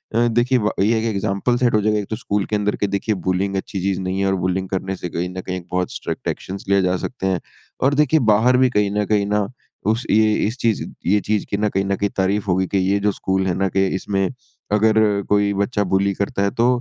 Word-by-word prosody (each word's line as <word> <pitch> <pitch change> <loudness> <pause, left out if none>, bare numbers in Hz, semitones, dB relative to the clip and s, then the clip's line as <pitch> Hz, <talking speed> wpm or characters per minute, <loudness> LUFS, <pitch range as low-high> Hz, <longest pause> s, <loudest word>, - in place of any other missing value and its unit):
अ, 120 +1 +4
देखिए 120 +3 +2
व 105 -1 0
ये 110 +4 +3
एक 110 - -1
एक्ज़ैंपल 100 +4 0
सेट 120 -1 +2
हो 105 - +3
जाएगा 105 0 +1
ये 105 - -4
तो 110 - -2
स्कूल 105 -3 -2
के 105 - -2
अंदर 105 0 0
के 105 - -1
देखिए 100 +2 -1
बुलिंग 95 +2 0
अच्छी 95 +1 -3
चीज़ 95 0 0
नहीं 95 0 -2
है। 100 - +1
और 95 - +2
बुलिंग 95 +1 -1
करने 95 0 -2
से 90 - -6
कहीं 85 +2 -3
न 90 0 -6
कहीं 90 0 -4
एक 90 - -9
बहुत 90 0 -1
स्ट्रिक्ट - - -5
एक्शंस 95 +1 -5
लिए 100 0 +4
जा 90 0 +1
सकते 95 -1 -4
हैं। 95 -2 +1 0.4
और 135 +2 +4
देखिए, 150 +1 +3
बाहर 115 +1 +4
भी 130 0 +4
कहीं 105 -4 +1
न 105 - +1
कहीं 105 -1 +1
ना 105 -1 +1 0.4
उस 115 +3 -2
ये - - +4 0.2
ये - - +1
इस 115 +4 -4
चीज़ 115 -4 0 0.2
ये 100 +4 +3
चीज़ 105 0 -1
की 100 - -1
ना 105 +1 +1
कहीं 95 0 -1
न 100 0 0
कहीं 100 +1 -1
तारीफ़ 100 +2 +1
होगी 95 0 +1
कि 100 - -1
ये 95 +2 +2
जो 105 +1 +1
स्कूल 95 0 -1
है 90 - +1
ना 95 +1 +1
के 95 +1 +1
इसमें, 95 0 -1 0.4
अगर 110 +1 +4 0.3
कोई 100 0 +3
बच्चा 100 +2 0
बुली 100 +1 +2
करता 100 0 -2
है 100 - +1
तो 120 - +5
100 Hz, 260 wpm, -21 LUFS, 95-110 Hz, 0.4 s, तो